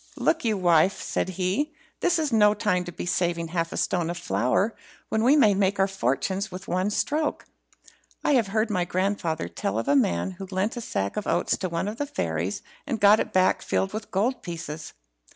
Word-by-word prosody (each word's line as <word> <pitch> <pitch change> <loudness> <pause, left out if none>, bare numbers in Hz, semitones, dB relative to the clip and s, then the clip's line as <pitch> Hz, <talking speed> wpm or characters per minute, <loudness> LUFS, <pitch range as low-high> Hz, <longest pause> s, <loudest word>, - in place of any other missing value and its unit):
"Look 325 - +1
you, 220 -3 +1
wife," 175 0 +3
said - - -2
he, 195 - -1 0.2
"this 350 0 +2
is 305 -6 -1
no 210 -1 +5
time 185 -3 0
to 175 - -6
be 170 - -6
saving 170 -2 0
half 165 -1 -1
a - - -5
stone 175 -3 0
of 175 - -3
flour 125 - 0 0.3
when 220 0 +1
we 265 +5 +6
may 225 -9 +5
make 195 0 +1
our 195 - +4
fortunes 190 - -1
at 185 +2 -8
one 185 +3 0
stroke. 295 +8 -1 0.8
I - - +2
have 245 -7 +3
heard 215 +2 0
my 180 -3 +1
grandfather 180 - -1
tell 100 +4 -3
of 115 - -2
a 140 - +4
man 85 - +2
who 190 +1 -8
lent 195 +4 -1
a 240 - -4
sack 100 - -3
of 210 - -3
oats - - +1
to 185 - -3
one 170 +3 -2
of 215 +2 -4
the 290 - -2
fairies, 85 - -2 0.2
and 235 -6 -2
got 205 +1 +6
it - - -2
back 185 0 +3
filled 195 +1 -1
with 215 0 -5
gold 235 +7 0
pieces. 160 -4 -6
190 Hz, 210 wpm, -26 LUFS, 170-215 Hz, 0.8 s, we